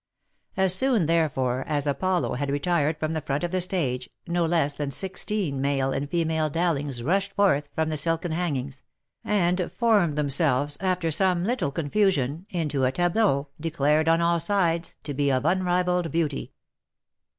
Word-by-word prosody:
As 190 -1 +4
soon, 235 -3 +2
therefore, 135 -6 0
as 145 -2 -1
Apollo 175 +6 0
had 140 +2 -2
retired 150 +1 0
from 155 +1 -2
the 160 - -2
front 140 +2 -2
of 175 - -2
the 185 0 +1
stage, 135 -9 0 0.2
no 170 -1 0
less 160 -4 +1
than 145 0 -3
sixteen 185 -2 -2
male 135 -1 0
and 140 +1 -3
female 160 -2 0
Dowlings 145 -6 -1
rushed 195 +7 0
forth 150 -8 +2
from 160 0 0
the 155 - -2
silken 165 +3 -1
hangings, 140 -6 -3 0.4
and 180 -3 0
formed 210 -10 +2
themselves, 145 -1 +1
after 180 -3 0
some 180 +1 +2
little 240 - 0
confusion, 160 0 0
into 150 -6 -1
a 130 - +3
tableau, 175 -3 +1
declared, 155 -1 +1
on 165 +1 +3
all 170 0 +2
sides, 170 -2 0
to 145 - -4
be 140 0 +1
of 130 +1 0
unrivalled 180 -1 +1
beauty. 155 -3 -2
160 Hz, 160 wpm, -25 LUFS, 145-180 Hz, 0.4 s, As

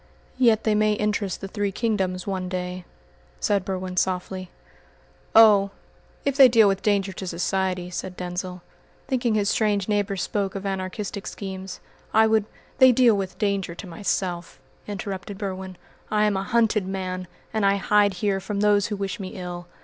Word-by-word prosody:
"Yet 230 -4 +4
they 215 - +2
may 215 0 +3
interest 210 -2 -1
the 195 - -4
three 205 0 -2
kingdoms 190 -5 -1
one 185 -2 -3
day," 180 0 -4 0.5
said 200 -2 +1
Berwin 185 -1 -4
softly. 185 0 -1 0.9
"Oh, 210 -3 +7 0.6
if 280 -1 +1
they 275 -2 +9
deal 225 -3 +5
with 195 -1 +1
danger 200 -2 +1
to 190 0 -6
society," 180 +1 -1
said 180 +1 -5
Denzil, 180 0 -5 0.4
thinking 245 -4 +1
his 205 -1 +1
strange 205 -2 +1
neighbour 205 -2 0
spoke 195 +1 -2
of 195 0 -5
anarchistic 195 +1 -4
schemes, 190 -1 -7 0.3
"I 220 0 +7
would 220 -1 +3 0.2
" - - -31
"They 260 -1 +8
deal 240 -2 +5
with 195 -2 -4
danger 200 -4 -1
to - - -8
myself," 175 -4 -3 0.3
interrupted 195 -1 -5
Berwin. 190 -2 -5 0.3
"I 210 0 +2
am 210 -1 +1
a 190 - 0
hunted 220 -2 +1
man, 185 -1 -4 0.3
and 220 -1 0
I 195 0 +4
hide 205 0 +3
here 195 -1 +2
from 200 +1 -3
those 205 -1 +3
who 210 - -3
wish 195 -1 -4
me 185 -2 -6
ill. 175 -1 -6
195 Hz, 170 wpm, -24 LUFS, 185-210 Hz, 0.9 s, they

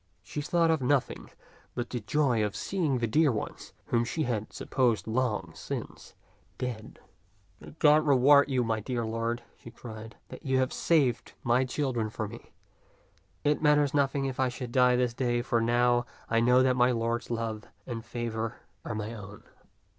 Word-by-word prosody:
She 115 +9 -5
thought 165 +2 +2
of 160 -3 +1
no 135 +2 +4
thing - - -11 0.5
but 120 -1 -4
the 125 - -2
joy 120 -1 +1
of 105 -1 -2
seeing 165 -9 -1
the 120 - 0
dear 145 +6 +3
ones 110 - -5
whom 120 -1 +1
she 155 +7 -2
had 110 -5 -2
supposed 120 -4 0
long 110 -7 -1
since - - -7 0.4
dead. 120 -4 -5 0.3
" 95 -2 -36
May - - -13
God 150 0 +5
reward 140 +1 +6
you, 130 -2 +1
my 110 -1 0
dear 120 +1 -3
lord," 115 +1 -2
she - - -12
cried, 115 -1 -10
" - - -41
that - - -10
you 130 -2 +1
have 130 0 +1
saved 140 -8 +1
my 120 +2 +3
children 125 -4 -1
for 110 0 -4
me. 115 +3 -12 0.9
It 150 0 +2
matters 150 -2 +3
nothing 140 -1 +1
if 130 -1 -4
I 130 -1 +2
should 125 -1 -6
die 125 0 +4
this 125 -1 +1
day, 120 -1 0
for 120 -2 +1
now 120 +1 +2 0.2
I 115 - +2
know 125 +2 +5
that 130 -1 +3
my 125 0 +4
lord's 115 0 -1
love 115 -2 -3 0.2
and 115 -3 -5
favor 115 -1 -4 0.3
are 110 - -4
my 105 +1 -4
own." 105 -1 -10
120 Hz, 185 wpm, -29 LUFS, 115-130 Hz, 0.9 s, reward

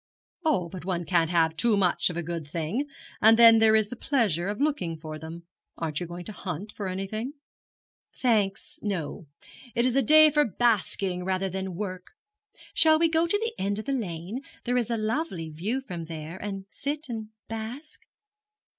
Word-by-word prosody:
'Oh, 280 - +2
but 180 0 -8
one 175 -2 -2
can't 170 -3 +2
have 165 -2 +2
too 215 +5 +2
much 185 -2 +3
of 175 - -5
a 175 - -2
good 165 -2 -4
thing; 170 - -2 0.3
and 220 +1 +7
then 230 -1 +9
there 220 0 +6
is 215 -1 +3
the 250 - -6
pleasure 215 - 0
of 205 +1 -3
looking 280 - 0
for 155 -1 -7
them. 165 +2 -9 0.3
Aren't 155 -3 -2
you 175 - -4
going 175 +1 -8
to - - -5
hunt 195 0 -5
for 205 -2 -5
anything?' 195 +7 -3 0.9
'Thanks, 230 +5 0
no. 180 -4 -3 0.5
It 235 - +3
is 255 -1 +1
a 275 - +5
day 310 +4 +7
for 295 0 +4
basking 200 -5 +1
rather 190 +1 0
than 190 -1 -4
work. 185 -2 -6 0.6
Shall 315 -1 +5
we 330 +1 +3
go 325 +1 +2
to 410 - +2
the 455 +2 -2
end 200 +1 0
of 215 - -5
the 275 - -2
lane 200 -1 -3 0.2
there 245 0 0
is 245 -2 +1
a 230 - 0
lovely 215 - -2
view 205 +12 -2
from 175 -10 -6
there 160 +1 -7
and 195 -1 -5
sit 290 +2 -2
and 225 -3 -5 0.2
bask?' 225 +7 -6
205 Hz, 190 wpm, -27 LUFS, 175-245 Hz, 0.9 s, then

